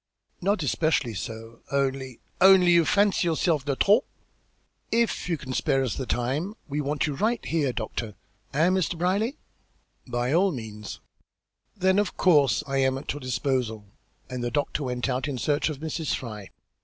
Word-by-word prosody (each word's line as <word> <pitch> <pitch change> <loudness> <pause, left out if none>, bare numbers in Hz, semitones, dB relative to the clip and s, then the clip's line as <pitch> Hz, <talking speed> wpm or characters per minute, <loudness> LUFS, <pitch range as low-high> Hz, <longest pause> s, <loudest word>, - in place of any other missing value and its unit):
"Not 195 -1 +1
especially 145 -4 +1
so 115 +3 -7
only 135 -2 -1
" - - -36
"Only 180 -2 +6
you 170 -1 +5
fancy 200 -2 +3
yourself 160 -3 +1
de 140 -2 0
trop? 210 - +4 0.9
If 230 -5 +1
you 165 - +1
can 130 -2 -6
spare 135 +1 +1
us 125 -6 -1
the 130 - -4
time, 140 - -1
we 150 0 -2
want 145 0 0
you 150 - -2
right 220 - 0
here, 150 -5 +1
doctor. 110 -2 -4 0.4
Eh, 155 +5 +3
Mr. 185 -2 0
Brierly?" 200 - 0 0.7
"By 120 +2 -1
all 190 +3 +4
means." 110 - -7 0.8
"Then 190 +1 +3
of 205 -2 -1
course 145 -8 +4
I 135 -1 -2
am 130 0 +2
at 135 - -4
your 145 - -7
disposal," 125 -4 -1 0.4
and 125 -1 -5
the 120 - 0
doctor 145 +3 -1
went 125 0 -2
out 130 +2 -1
in 140 -3 -3
search 145 +5 +1
of 155 - -4
Mrs. 160 -1 -2
Fry. 105 -5 -7
140 Hz, 170 wpm, -26 LUFS, 125-175 Hz, 0.9 s, Only